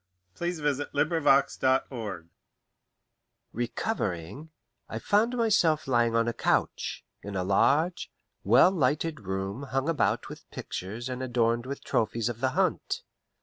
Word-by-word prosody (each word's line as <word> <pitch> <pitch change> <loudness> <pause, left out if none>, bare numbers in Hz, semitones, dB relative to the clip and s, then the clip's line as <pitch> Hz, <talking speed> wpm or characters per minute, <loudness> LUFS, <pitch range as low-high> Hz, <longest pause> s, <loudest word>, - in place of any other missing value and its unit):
A - - -23
DANSEUSE 155 -5 -1
AND 145 +2 -1
THE 165 -1 +1
BASTILE 130 - +1 1.3
Recovering, 120 - -3 0.4
I 110 - -4
found 215 - +2
myself 195 - +2
lying 120 -3 +2
on 115 0 +2
a 120 - 0
couch, - - -1 0.2
in 100 0 -7
a 90 - 0
large, 145 - +2 0.3
well 125 - +6
lighted 155 -1 0
room 95 +3 -4
hung 135 0 -2
about 165 -2 +1
with - - -11
pictures 110 +7 -6
and 130 0 -4
adorned 120 -1 +1
with 140 +1 -6
trophies 115 +1 0
of 120 -1 -5
the 130 +1 +1
hunt. - - 0
130 Hz, 135 wpm, -28 LUFS, 115-155 Hz, 1.3 s, well